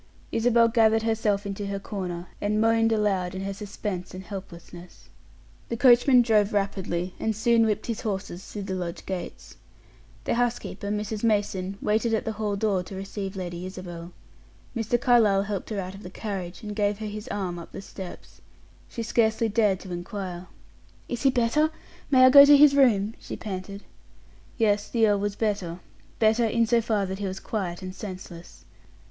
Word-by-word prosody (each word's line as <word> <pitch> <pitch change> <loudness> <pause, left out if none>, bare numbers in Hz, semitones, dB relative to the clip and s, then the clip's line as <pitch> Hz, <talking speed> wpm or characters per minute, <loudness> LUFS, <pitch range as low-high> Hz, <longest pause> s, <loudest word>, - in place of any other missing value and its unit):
Isabel 230 0 +4
gathered 225 -1 +3
herself 220 -2 0
into 200 0 -4
her 200 0 -3
corner, 185 -4 -5 0.2
and 210 +1 0
moaned 225 0 +3
aloud 195 -4 0
in 190 - -4
her 195 0 -3
suspense 195 -2 -5
and 185 - -7
helplessness. 180 -3 -10 0.6
The 235 - -2
coachman 245 0 +6
drove 215 -3 +2
rapidly, 190 -3 -1
and 220 -1 -1
soon 230 +1 +3
whipped 210 - -1
his 230 -2 -3
horses 190 -3 -4
through 205 0 -7
the 195 -1 -4
lodge 175 -2 -5
gates. 185 -2 -6 0.7
The - - 0
housekeeper, 235 -4 -2
Mrs. 210 +1 -3
Mason, 200 -3 0
waited 225 +2 +1
at - - -2
the 225 - -1
hall 210 -1 -2
door 200 -2 +1
to 180 +2 -9
receive 195 0 -5
Lady 175 -2 -5
Isabel. 180 -2 -8 0.6
Mr. 230 +1 0
Carlyle 220 -6 +4
helped 200 -2 -4
her 210 -3 -3
out 185 0 -5
of 195 - -11
the 180 - -8
carriage, 190 -2 -6
and 210 -1 -5
gave 205 -1 +1
her 215 - -6
his 210 +2 -6
arm 185 -6 -3
up 170 - -11
the - - -7
steps. 190 -1 -10 0.5
She 230 - -5
scarcely 225 0 +1
dared 210 -3 +2
to 185 - -7
inquire. 180 0 -6 0.6
"Is 240 - -4
he 275 - +4
better? 260 +5 +2 0.4
May 260 -2 +7
I 255 - +7
go 280 +1 +11
to 290 0 +8
his 285 -1 +7
room?" 225 -6 +4
she - - -7
panted. 200 -1 -6 0.7
Yes, 210 -3 +1
the 225 -2 +3
earl 205 -1 +2
was 205 0 -2
better 200 -6 -2 0.4
better, 225 +1 +3
in 230 +1 +2
so 235 +1 +3
far 215 -3 0
as 190 - -4
that 190 +1 -4
he 200 - -2
was 190 0 -5
quiet 185 -4 -4
and 185 0 -6
senseless. 185 -4 -9
205 Hz, 180 wpm, -26 LUFS, 190-225 Hz, 0.7 s, go